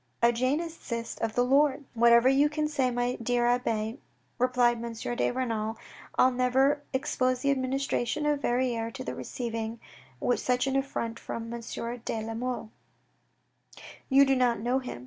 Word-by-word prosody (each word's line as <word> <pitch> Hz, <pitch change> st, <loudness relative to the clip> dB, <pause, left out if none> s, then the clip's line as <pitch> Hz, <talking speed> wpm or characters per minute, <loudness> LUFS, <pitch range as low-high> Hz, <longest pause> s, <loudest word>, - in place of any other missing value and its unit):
A 235 Hz, -, +6 dB
Jansenist, 255 Hz, -2 st, -2 dB
by -, -, +1 dB
the 245 Hz, +3 st, +1 dB
Lord." 280 Hz, +3 st, +3 dB
" -, -, -37 dB
Whatever 235 Hz, +1 st, +7 dB
you 275 Hz, +3 st, +4 dB
can 305 Hz, 0 st, -1 dB
say, 275 Hz, -4 st, +1 dB
my 245 Hz, 0 st, -1 dB
dear 240 Hz, +1 st, +1 dB
abbe, 230 Hz, 0 st, 0 dB, 0.4 s
replied 240 Hz, -2 st, +2 dB
M. 235 Hz, -1 st, -4 dB
de 240 Hz, +1 st, -1 dB
Renal, 225 Hz, -3 st, -2 dB, 0.4 s
I'll 255 Hz, -, +5 dB
never 265 Hz, +3 st, +2 dB
expose 255 Hz, -2 st, 0 dB
the 280 Hz, -, +2 dB
administration 270 Hz, +1 st, -1 dB
of 295 Hz, -1 st, +1 dB
Verrieres 240 Hz, -3 st, 0 dB
to 260 Hz, -, -6 dB
receiving 230 Hz, -2 st, -4 dB, 0.6 s
such 250 Hz, 0 st, 0 dB
an 270 Hz, 0 st, -1 dB
affront 235 Hz, -4 st, -2 dB
from 230 Hz, 0 st, -6 dB
M. 235 Hz, -, -5 dB, 0.4 s
de 225 Hz, -, -2 dB
la 225 Hz, -, -4 dB
Mole. 240 Hz, -1 st, -4 dB, 1.4 s
You 275 Hz, +1 st, +6 dB
do 270 Hz, 0 st, +3 dB
not 245 Hz, -3 st, +2 dB
know 245 Hz, +4 st, +1 dB
him. 250 Hz, -, -7 dB
250 Hz, 155 wpm, -28 LUFS, 235-270 Hz, 1.4 s, Whatever